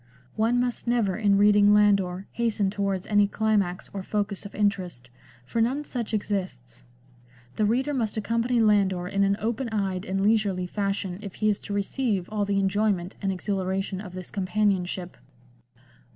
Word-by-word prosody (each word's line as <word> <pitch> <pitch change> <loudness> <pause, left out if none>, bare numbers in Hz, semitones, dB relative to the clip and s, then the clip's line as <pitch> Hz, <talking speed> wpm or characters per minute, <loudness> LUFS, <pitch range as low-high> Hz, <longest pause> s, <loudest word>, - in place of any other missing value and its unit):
One 230 +3 +2
must 245 -1 -2
never 230 -6 +1
in 205 -2 +3
reading 205 0 +6
Landor 200 -3 +2
hasten 215 -4 0
towards 195 -2 -2
any 205 -1 +3
climax 205 -4 0
or 195 - -4
focus 200 0 -2
of - - -15
interest, 180 -12 -1 0.3
for 230 - -1
none 260 +6 +1
such 245 -6 -4
exists; 185 - -4 0.7
the 215 - +2
reader 260 +6 +1
must 225 -5 -1
accompany 230 +3 0
Landor 195 -4 +2
in 200 +1 +1
an 200 0 +2
open 235 +3 -2
eyed 195 -4 -1
and 195 +1 -1
leisurely 205 -4 +2
fashion 195 -1 -2
if 200 -4 -8
he 215 - +1
is 205 - 0
to 205 - -7
receive 200 -2 -1
all 210 -1 0
the 200 0 0
enjoyment 195 -2 0
and 195 -1 0
exhilaration 190 0 -2
of 185 -4 -9
this 185 -1 -7
companionship. 185 -2 -1
200 Hz, 160 wpm, -26 LUFS, 190-215 Hz, 0.7 s, reading